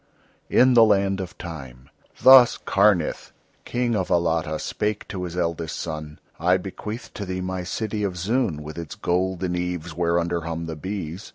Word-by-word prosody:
IN 130 0 +5
THE 115 -2 +8
LAND 100 -2 +2
OF 90 -1 -8
TIME 65 -7 -9 0.4
Thus 130 -2 +8
Karnith, 100 -5 +1 0.3
King 120 -1 0
of 95 -3 -1
Alatta, 80 -2 +1
spake 105 +6 -3
to 90 -2 -4
his 90 0 -6
eldest 85 -2 -2
son: 75 -2 -6 0.2
"I 90 +3 +3
bequeath 105 +4 -7
to 105 - -5
thee 95 -1 -4
my 90 0 -3
city 105 +3 -3
of 95 -3 -2
Zoon, 95 - 0
with 75 +2 -7
its 85 -3 -7
golden 90 0 -1
eaves, 90 -2 -3
whereunder 85 0 0
hum 85 0 -4
the 80 -1 -5
bees. 95 +2 -6
90 Hz, 165 wpm, -24 LUFS, 85-100 Hz, 0.4 s, THE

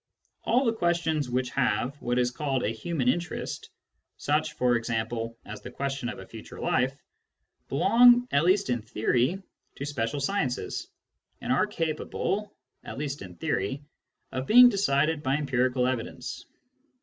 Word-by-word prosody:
All 255 +4 +3
the 230 - +2
questions 170 - 0
which 125 0 -1
have 125 +1 0
what 120 +1 -1
is 125 0 +2
called 135 -2 -1
a - - +1
human 130 +4 -2
interest 170 +7 -2 0.2
— - - -50
such, - - 0
for 125 -1 +2
example, 115 0 -2
as 105 0 -8
the - - -8
question 135 -1 -3
of - - -6
a - - -9
future - - -11
life 130 +2 +1 0.4
— - - -49
belong, 240 - +6
at 140 - +3
least 185 -3 +3
in. 120 -2 0
theory, 120 - 0 0.3
to 140 - -5
special 145 -1 -2
sciences, 140 -4 -2 0.5
and - - -1
arc - - +2
capable, 190 +6 -2 0.3
at - - -8
least 145 0 -4
in 90 -2 -9
theory, 100 - -2 0.5
of 130 +1 -4
being 245 +2 +9
decided 155 - +1
by 135 -1 +1
empirical 130 -3 +1
evidence. 130 +1 -4
135 Hz, 155 wpm, -27 LUFS, 125-165 Hz, 0.5 s, being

